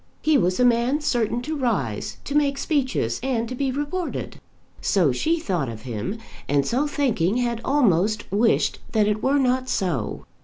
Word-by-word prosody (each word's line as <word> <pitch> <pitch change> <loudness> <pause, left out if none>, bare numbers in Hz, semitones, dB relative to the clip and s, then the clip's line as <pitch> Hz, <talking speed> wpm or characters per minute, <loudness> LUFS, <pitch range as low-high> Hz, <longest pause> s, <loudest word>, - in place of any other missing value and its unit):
He 310 0 +3
was 185 -7 +2
a 250 - +5
man 245 +4 +3
certain 240 -4 0
to 310 +4 -3
rise, 205 - -2
to 280 - -5
make 285 -2 +2
speeches, 260 - 0
and 240 -3 -1
to 250 - -5
be 270 +1 -1
reported. 295 +6 -4 0.4
So 180 -8 +3
she 325 - 0
thought 175 - -1
of 110 -1 -8
him; 120 - -4 0.3
and 140 -1 +2
so 265 - +1
thinking 235 - +1
had 235 -2 -1
almost 215 - +2
wished 220 +4 +2
that 215 -2 +3
it 210 0 0
were 275 +4 +2
not 255 -1 +1
so. 170 - -2
235 Hz, 170 wpm, -23 LUFS, 185-275 Hz, 0.4 s, a